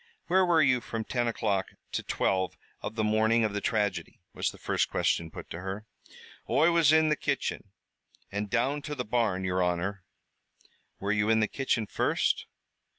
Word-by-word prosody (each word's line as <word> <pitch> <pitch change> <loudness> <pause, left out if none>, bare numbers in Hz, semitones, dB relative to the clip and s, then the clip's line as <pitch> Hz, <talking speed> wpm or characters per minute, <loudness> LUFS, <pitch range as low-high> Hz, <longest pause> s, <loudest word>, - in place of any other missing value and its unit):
"Where 190 +1 +4
were 165 -3 +5
you 130 -2 +3
from 115 -1 -4
ten 120 +1 -1
o'clock 100 -4 0 0.2
to - - -1
twelve 95 -1 0 0.2
of 110 - -5
the 110 - 0
morning 110 +2 +3
of 110 -2 0
the 105 - -2
tragedy?" 100 -7 -1
was - - 0
the - - -11
first - - 0
question 85 -1 0
put - - -9
to 85 - -5
her. 95 +3 -5 0.6
"Oi 165 +2 +4
was 165 -3 +5
in 160 0 +5
the 150 - +3
kitchen, 140 -7 -2 0.6
an' 100 +1 -2
down 130 +7 0
to 150 0 -5
the 125 -3 -3
barn, 105 -5 0
yer 95 0 0
honor." 90 +3 -1 1.0
"Were 100 +1 -1
you 105 0 +1
in 110 0 +4
the 110 - +2
kitchen 125 -4 -1
first." - - 0
110 Hz, 180 wpm, -29 LUFS, 100-130 Hz, 1.0 s, were